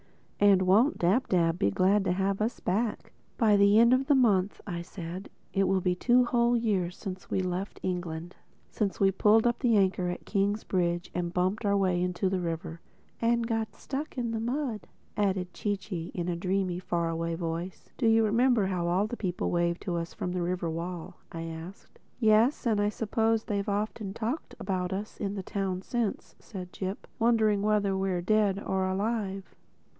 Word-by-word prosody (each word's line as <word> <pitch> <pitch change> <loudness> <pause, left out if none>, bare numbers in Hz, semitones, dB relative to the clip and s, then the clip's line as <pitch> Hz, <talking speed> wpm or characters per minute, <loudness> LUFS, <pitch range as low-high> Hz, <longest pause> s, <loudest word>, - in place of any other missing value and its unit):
And 200 -2 +5
won't 210 +10 +4
Dab 195 +10 +2
Dab 170 -2 +2
be 100 - +3
glad 190 - +3
to 180 - +2
have 195 +2 0
us 225 +4 -1
back!" 210 +4 -1 0.3
"By 220 -4 +4
the 200 +1 +5
end 235 +2 +6
of 255 - +5
next 290 - +6
month," 205 -7 +2 0.2
said 175 +1 -7 0.3
I, - - +1
"it 195 - +3
will 190 0 +2
be 180 0 +1
two 245 +7 +3
whole 240 0 +2
years 190 -6 0
since 185 -3 -7
we 190 - 0
left 185 +2 -3
England—since 180 +3 -4
we 195 -1 +4
pulled 215 +4 +4
up 240 0 +2
the 235 -5 +3
anchor 190 -2 +2
at 175 - -5
Kingsbridge 190 -4 0
and 175 -1 -2
bumped 185 +4 0
our 200 -1 +2
way 185 -2 +1
out - - +2
into 180 +1 -1
the 185 0 0
river." 165 -1 -4 0.4
"And 235 0 +2
got 225 -1 -2
stuck 290 +3 -5
on 235 -2 -1
the 225 - -2
mud 240 -1 -2
bank," - - -22 0.3
added 190 -3 0
Chee 205 -1 -1
Chee 185 -4 -6
in 175 -1 -2
a 175 - -1
dreamy, 185 0 -1
far 170 -2 -1
away 165 0 -2
voice. 170 +2 -5
"Do 240 - +2
you 225 0 +5
remember 230 0 +3
how 180 -3 -1
all 180 +4 +2
the 220 - -4
people 185 -6 -2
waved 170 0 0
to 175 - -2
us 165 0 -5
from 180 - -3
the 180 0 -2
river 175 -1 -1
wall?" 170 +1 -5
I 165 -1 -5
asked. 165 +3 -9 0.2
"Yes. 225 +4 +3
And 215 -3 +2
I 205 - +2
suppose 225 +1 0
they've 200 -2 -2
often 205 0 -2
talked 235 +8 -3
about 185 -1 -2
us 200 +3 -5
in 200 -1 -2
the 195 - -4
town 190 -1 -3
since," 235 -3 -2
said 180 -4 -9
Jip—"wondering 215 +2 0
whether 205 -2 +2
we're 190 -2 -1
dead 210 0 +2
or 190 0 0
alive." 195 0 -2
195 Hz, 190 wpm, -29 LUFS, 180-220 Hz, 0.4 s, end